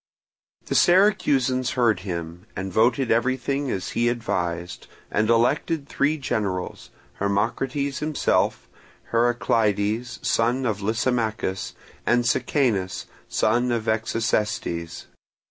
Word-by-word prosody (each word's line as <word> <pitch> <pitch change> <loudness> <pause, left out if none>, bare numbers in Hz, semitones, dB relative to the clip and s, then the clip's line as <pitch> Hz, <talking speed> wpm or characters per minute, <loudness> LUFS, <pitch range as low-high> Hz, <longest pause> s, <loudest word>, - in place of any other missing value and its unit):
The - - -3
Syracusans 135 - +3
heard 115 -6 +2
him, 85 -2 -6
and 95 0 -4
voted 115 +4 +2
everything 130 +4 0
as 95 - -3
he 120 0 +1
advised, 90 -7 -3 0.2
and 110 +1 +1
elected 140 +6 +2
three 145 +3 +1
generals, 100 -9 -3 0.3
Hermocrates 125 +8 -1
himself, 155 -1 0 0.4
Heraclides, 115 -1 +1
son 120 +3 +1
of 105 -3 -1
Lysimachus, 110 -2 -1 0.3
and 120 0 +2
Sicanus, 120 - 0 0.2
son 120 +3 +1
of 115 -2 0
Execestes. 110 -6 -1
115 Hz, 95 wpm, -24 LUFS, 100-130 Hz, 0.4 s, Syracusans